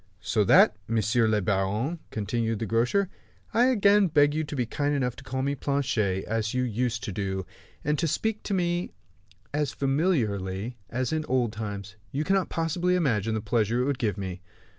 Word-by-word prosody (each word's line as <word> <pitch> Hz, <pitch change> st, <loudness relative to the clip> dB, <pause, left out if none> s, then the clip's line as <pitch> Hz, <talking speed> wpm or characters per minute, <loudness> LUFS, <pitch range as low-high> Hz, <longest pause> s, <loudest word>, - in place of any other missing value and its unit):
"So -, -, +2 dB
that, -, -, +6 dB
monsieur 115 Hz, +1 st, +2 dB
le 105 Hz, -1 st, +2 dB
baron," 105 Hz, -, 0 dB
continued 115 Hz, +1 st, -1 dB
the 115 Hz, -, -3 dB
grocer, 120 Hz, -, +2 dB, 0.5 s
"I 240 Hz, -, +5 dB
again 205 Hz, -5 st, +5 dB
beg 145 Hz, -3 st, +4 dB
you 155 Hz, +1 st, 0 dB
to 150 Hz, -, -6 dB
be 125 Hz, -3 st, 0 dB
kind 145 Hz, +5 st, -1 dB
enough 125 Hz, -3 st, 0 dB
to -, -, -11 dB
call 130 Hz, 0 st, -3 dB
me 140 Hz, +1 st, 0 dB
Planchet, 125 Hz, -9 st, 0 dB
as 110 Hz, +1 st, -1 dB
you 125 Hz, -, +2 dB
used 120 Hz, -1 st, -1 dB
to -, -, -3 dB
do; 95 Hz, -1 st, -3 dB, 0.4 s
and 150 Hz, 0 st, 0 dB
to 165 Hz, -, +1 dB
speak 215 Hz, +8 st, -1 dB
to 200 Hz, -, 0 dB
me 175 Hz, -, -1 dB, 0.6 s
as 150 Hz, -2 st, 0 dB
familiarly 120 Hz, -, 0 dB
as 130 Hz, +4 st, -1 dB
in 155 Hz, 0 st, 0 dB
old 125 Hz, -4 st, +1 dB
times. 105 Hz, -2 st, -6 dB
You 145 Hz, +2 st, -1 dB
cannot 195 Hz, +1 st, +1 dB
possibly 175 Hz, +2 st, 0 dB
imagine 115 Hz, -, +1 dB
the 110 Hz, -, -1 dB
pleasure 115 Hz, +2 st, +1 dB
it -, -, +1 dB
would 140 Hz, -2 st, -1 dB
give 105 Hz, -4 st, 0 dB
me." 95 Hz, -1 st, -5 dB
125 Hz, 185 wpm, -27 LUFS, 110-150 Hz, 0.6 s, that